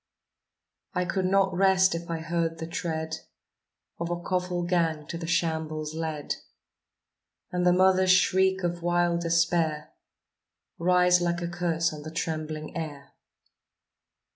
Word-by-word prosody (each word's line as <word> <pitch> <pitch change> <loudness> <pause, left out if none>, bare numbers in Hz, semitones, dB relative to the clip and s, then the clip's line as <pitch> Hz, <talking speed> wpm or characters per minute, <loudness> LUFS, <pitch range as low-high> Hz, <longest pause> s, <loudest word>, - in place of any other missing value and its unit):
I 180 - +1
could 185 +1 0
not 195 0 +3
rest 190 0 +4
if 170 0 -5
I 165 - -1
heard 165 0 -1
the 160 - -5
tread 160 -2 -3 0.8
Of 170 0 -3
a 175 0 -2
coffle 180 0 -2
gang 165 -4 0
to - - -4
the 165 - -5
shambles 160 -2 -1
led, 160 -2 -3 1.1
And 180 0 +1
the - - +6
mother's 185 +1 +4
shriek 190 +1 +3
of 175 0 -2
wild 175 0 +1
despair 165 -2 +1 0.9
Rise 180 0 +4
like 175 0 -1
a - - -1
curse 170 -1 0
on 150 - -8
the 155 - -7
trembling 155 -2 -4
air. 145 -4 -6
170 Hz, 135 wpm, -27 LUFS, 160-180 Hz, 1.1 s, the